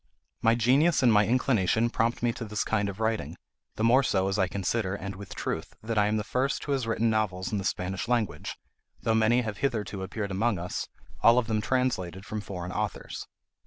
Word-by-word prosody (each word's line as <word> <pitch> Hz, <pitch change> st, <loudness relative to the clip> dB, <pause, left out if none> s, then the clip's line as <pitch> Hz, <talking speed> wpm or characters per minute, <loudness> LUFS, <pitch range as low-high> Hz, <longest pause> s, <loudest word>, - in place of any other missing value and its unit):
My 115 Hz, +1 st, +4 dB
genius 135 Hz, +7 st, +3 dB
and 120 Hz, -3 st, +6 dB
my 105 Hz, -1 st, +5 dB
inclination 115 Hz, -2 st, +2 dB
prompt 115 Hz, +1 st, 0 dB
me 120 Hz, -1 st, +2 dB
to 115 Hz, -, -6 dB
this 105 Hz, -2 st, -2 dB
kind 105 Hz, -2 st, 0 dB
of 100 Hz, +1 st, -7 dB
writing; 110 Hz, 0 st, -1 dB, 0.4 s
the 110 Hz, -, -2 dB
more 120 Hz, +4 st, +6 dB
so 95 Hz, -7 st, +1 dB
as 100 Hz, +1 st, -1 dB
I 95 Hz, -, +3 dB
consider 95 Hz, +1 st, -1 dB
(and 100 Hz, -1 st, -6 dB
with 100 Hz, 0 st, -9 dB
truth) -, -, -4 dB
that 110 Hz, -1 st, 0 dB
I 105 Hz, -, +4 dB
am 105 Hz, +1 st, +1 dB
the 105 Hz, -, -1 dB
first 125 Hz, +6 st, -1 dB
who 145 Hz, -, -3 dB
has 130 Hz, -4 st, 0 dB
written 115 Hz, 0 st, +1 dB
novels 110 Hz, -1 st, -1 dB
in 105 Hz, -, 0 dB
the -, -, -4 dB
Spanish 95 Hz, +1 st, -2 dB
language, 120 Hz, -4 st, -1 dB, 0.5 s
though 115 Hz, -, +2 dB
many 110 Hz, +2 st, +4 dB
have 105 Hz, -3 st, -4 dB
hitherto 105 Hz, -7 st, -1 dB
appeared 100 Hz, +1 st, -4 dB
among 105 Hz, +2 st, +1 dB
us, 90 Hz, +1 st, -4 dB, 0.3 s
all 115 Hz, +1 st, +6 dB
of 125 Hz, -, +3 dB
them 110 Hz, -1 st, 0 dB
translated 100 Hz, -8 st, -1 dB
from 105 Hz, 0 st, -4 dB
foreign 90 Hz, -3 st, -6 dB
authors. 105 Hz, +2 st, -4 dB
110 Hz, 210 wpm, -28 LUFS, 100-120 Hz, 0.5 s, and